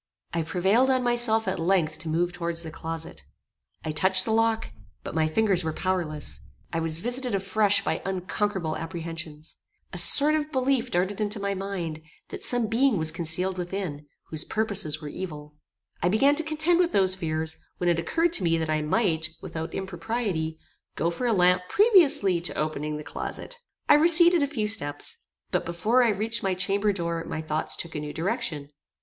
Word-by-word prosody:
I 170 Hz, -, 0 dB
prevailed 190 Hz, +10 st, +2 dB
on 260 Hz, -1 st, +2 dB
myself 240 Hz, -3 st, +2 dB
at 190 Hz, -, -1 dB
length 165 Hz, -3 st, +1 dB
to 160 Hz, -, -6 dB
move 175 Hz, +2 st, 0 dB
towards 170 Hz, -1 st, -2 dB
the 160 Hz, -, -7 dB
closet. 160 Hz, -, -6 dB, 0.6 s
I 155 Hz, -, -1 dB
touched 185 Hz, +4 st, +2 dB
the 220 Hz, -, -1 dB
lock, 225 Hz, -, +1 dB, 0.3 s
but -, -, -6 dB
my 160 Hz, 0 st, +1 dB
fingers 190 Hz, +1 st, +1 dB
were 160 Hz, -1 st, -2 dB
powerless; 155 Hz, -, -2 dB, 0.3 s
I 165 Hz, -, 0 dB
was 160 Hz, -1 st, 0 dB
visited 245 Hz, +3 st, -2 dB
afresh 200 Hz, +1 st, +2 dB
by -, -, -1 dB
unconquerable 190 Hz, -2 st, -2 dB
apprehensions. 165 Hz, -2 st, -7 dB, 0.4 s
A -, -, -2 dB
sort 295 Hz, +2 st, +5 dB
of 305 Hz, 0 st, -1 dB
belief 260 Hz, -2 st, +1 dB
darted 190 Hz, +2 st, -1 dB
into 210 Hz, 0 st, 0 dB
my 200 Hz, 0 st, -1 dB
mind, 185 Hz, -5 st, -4 dB, 0.3 s
that -, -, -7 dB
some 245 Hz, -2 st, +2 dB
being 230 Hz, +1 st, +2 dB
was 160 Hz, -1 st, +3 dB
concealed 175 Hz, +3 st, 0 dB
within, 175 Hz, -5 st, -5 dB, 0.2 s
whose 155 Hz, -2 st, -2 dB
purposes 200 Hz, -8 st, 0 dB
were -, -, -5 dB
evil. 150 Hz, -3 st, -7 dB, 0.5 s
I 175 Hz, -, +2 dB
began 270 Hz, +9 st, +4 dB
to 320 Hz, -, +2 dB
contend 315 Hz, +2 st, +1 dB
with 350 Hz, -1 st, +2 dB
those 190 Hz, -1 st, +3 dB
fears, 160 Hz, -3 st, -1 dB, 0.2 s
when 180 Hz, -, -2 dB
it 170 Hz, -1 st, +2 dB
occurred 330 Hz, -, 0 dB
to 195 Hz, -, +2 dB
me 165 Hz, -1 st, +2 dB
that 160 Hz, -1 st, -2 dB
I 155 Hz, 0 st, +1 dB
might, 160 Hz, -1 st, +1 dB
without 160 Hz, 0 st, -6 dB
impropriety, 190 Hz, -3 st, -3 dB, 0.4 s
go 170 Hz, +2 st, 0 dB
for 245 Hz, +8 st, -2 dB
a -, -, +2 dB
lamp 180 Hz, -2 st, +3 dB
previously 300 Hz, -, +4 dB
to 175 Hz, -, 0 dB
opening 150 Hz, 0 st, -2 dB
the 150 Hz, -, -7 dB
closet. -, -, -6 dB, 0.3 s
I -, -, +7 dB
receded 340 Hz, +2 st, +6 dB
a 285 Hz, -, +2 dB
few 250 Hz, -7 st, -2 dB
steps; 145 Hz, -10 st, +1 dB, 0.3 s
but -, -, 0 dB
before 210 Hz, +9 st, +1 dB
I 235 Hz, -, +3 dB
reached 220 Hz, +2 st, -1 dB
my 190 Hz, -1 st, 0 dB
chamber 200 Hz, +3 st, +1 dB
door 170 Hz, -3 st, -3 dB
my 160 Hz, -, -5 dB
thoughts 155 Hz, 0 st, -1 dB
took 170 Hz, -, -4 dB
a 150 Hz, -, -3 dB
new 150 Hz, 0 st, -6 dB
direction. 165 Hz, -, -3 dB
185 Hz, 185 wpm, -26 LUFS, 160-225 Hz, 0.6 s, I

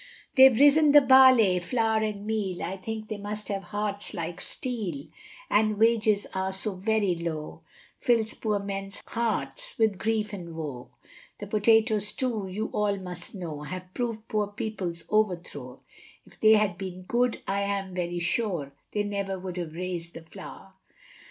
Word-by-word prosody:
They've 260 Hz, -3 st, +7 dB
risen 290 Hz, +1 st, +6 dB
the 290 Hz, -, +10 dB
barley, 260 Hz, -8 st, +7 dB
flour, 220 Hz, +3 st, +1 dB
and 210 Hz, -2 st, -3 dB
meal, 210 Hz, -5 st, -2 dB
I 190 Hz, -, -3 dB
think 215 Hz, +3 st, -6 dB
they 215 Hz, -1 st, -5 dB
must 210 Hz, +1 st, -5 dB
have 200 Hz, -1 st, -2 dB
hearts 205 Hz, +1 st, -4 dB
like 170 Hz, 0 st, -4 dB
steel, 200 Hz, -, -4 dB, 0.4 s
And 215 Hz, 0 st, +2 dB
wages 220 Hz, -2 st, +3 dB
are 190 Hz, 0 st, -1 dB
so 195 Hz, +2 st, 0 dB
very 200 Hz, 0 st, +1 dB
low, 165 Hz, -3 st, -5 dB, 0.4 s
Fills 230 Hz, -1 st, +2 dB
poor 215 Hz, -2 st, -1 dB
men's 195 Hz, 0 st, -5 dB
hearts 235 Hz, -, -3 dB
with 220 Hz, -5 st, +2 dB
grief 215 Hz, -1 st, -1 dB
and 170 Hz, -4 st, -7 dB
woe; 140 Hz, -7 st, -6 dB, 0.5 s
The 205 Hz, -, -7 dB
potatoes 215 Hz, 0 st, +3 dB
too, 230 Hz, -7 st, -2 dB
you 210 Hz, +4 st, -4 dB
all 205 Hz, -1 st, +1 dB
must 180 Hz, 0 st, -6 dB
know, 165 Hz, -6 st, -6 dB
Have 185 Hz, +4 st, -7 dB
proved 230 Hz, -2 st, -3 dB
poor 210 Hz, -1 st, 0 dB
people's 200 Hz, -5 st, -4 dB
overthrow, 175 Hz, -11 st, -1 dB, 0.4 s
If -, -, -20 dB
they 220 Hz, 0 st, +7 dB
had 210 Hz, -5 st, +2 dB
been 185 Hz, -1 st, -6 dB
good, 240 Hz, +5 st, 0 dB
I 200 Hz, +1 st, 0 dB
am 200 Hz, -2 st, -2 dB
very 175 Hz, -1 st, -2 dB
sure 175 Hz, -5 st, -1 dB, 0.2 s
They 210 Hz, -, +1 dB
never 200 Hz, -1 st, -3 dB
would 185 Hz, -1 st, -6 dB
have 170 Hz, -3 st, -4 dB
rais'd 175 Hz, -1 st, -5 dB
the 165 Hz, -, -8 dB
flour. 190 Hz, +2 st, -11 dB
205 Hz, 160 wpm, -27 LUFS, 180-220 Hz, 0.5 s, the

